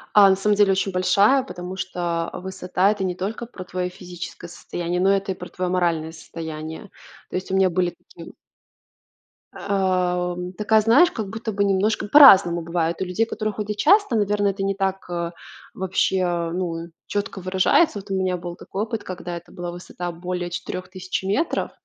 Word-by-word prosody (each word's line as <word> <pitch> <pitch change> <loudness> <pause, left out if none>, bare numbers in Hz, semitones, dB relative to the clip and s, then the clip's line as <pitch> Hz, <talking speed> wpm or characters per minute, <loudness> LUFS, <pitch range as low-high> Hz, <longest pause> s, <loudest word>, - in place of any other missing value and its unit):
А, 200 -2 +8
на 190 - +5
самом 205 +2 +1
деле, 200 -1 +4
очень 195 +1 0
большая, 200 +8 +4
потому 180 -4 -7
что 175 -3 -2
высота- 185 +1 0
это 205 -2 -3
не 180 -1 -1
только 210 +6 -4
про 200 -6 -9
твое 180 0 -3
физическое 175 -1 -9
состояние, 175 +1 -4
но 190 - +4
это 195 0 0
и - - -3
про 180 0 -9
твое 180 -1 -3
моральное 170 -3 0
состояние. 160 +3 -8 0.4
То - - -5
есть 185 - -3
у 190 - 0
меня 190 -1 +4
были 175 0 0 0.2
такие - - -10 1.2
Ам, 180 -2 -1
такая, 215 +3 +3
знаешь, 240 +11 +5
как 215 -3 -4
будто 225 +1 -4
бы 200 0 0
немножко 200 +2 +1
по-разному 200 - +8
бывает. 165 0 -1
У - - 0
людей, 180 +5 0
которые, 215 -1 -3
ходят 210 0 -4
часто, 395 - +4
наверное, 205 -1 +2
это 195 0 -5
не 195 0 +1
так, 195 -1 -2
э, 170 -1 -3 0.4
вообще, 190 0 0
э, 175 -2 0
ну, 170 -2 -3 0.2
четко 200 -1 -3
выражается. 190 - +2
Вот 200 +1 -13
у 195 - -1
меня 185 -1 0
был 175 0 -7
такой 195 +3 -4
опыт, 225 0 -4
когда 175 -1 -6
это 170 - -13
была 175 0 -5
высота 175 0 -6
более 175 +1 -4
4000 185 +1 -5
метров, 205 - -1
185 Hz, 180 wpm, -23 LUFS, 175-200 Hz, 1.2 s, А